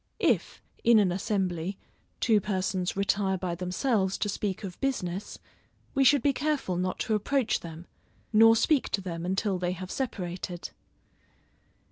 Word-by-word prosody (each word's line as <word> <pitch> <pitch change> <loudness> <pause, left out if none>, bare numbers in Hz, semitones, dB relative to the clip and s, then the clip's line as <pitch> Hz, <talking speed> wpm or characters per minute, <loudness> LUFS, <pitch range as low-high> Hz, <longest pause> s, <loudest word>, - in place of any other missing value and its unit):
If, - - 0 0.2
in 235 -1 +6
an 200 -4 +4
assembly, 185 -1 -1 0.4
two 220 -3 +3
persons 185 -2 -1
retire 195 -1 +1
by 180 -1 -3
themselves 190 +3 0
to 205 - -1
speak 200 -1 -3
of 185 -3 -7
business, 200 -8 -2 0.6
we 275 - +3
should 270 -1 +5
be 285 - +3
careful 285 -10 -1
not 185 +1 -1
to 220 - 0
approach 235 +3 +1
them, 165 0 -9 0.5
nor 225 +1 +7
speak 285 +4 +2
to 200 - +1
them 170 -2 -5
until 190 0 0
they 180 0 -1
have 185 +1 -7
separated. 180 -8 -4
195 Hz, 145 wpm, -28 LUFS, 180-225 Hz, 0.6 s, nor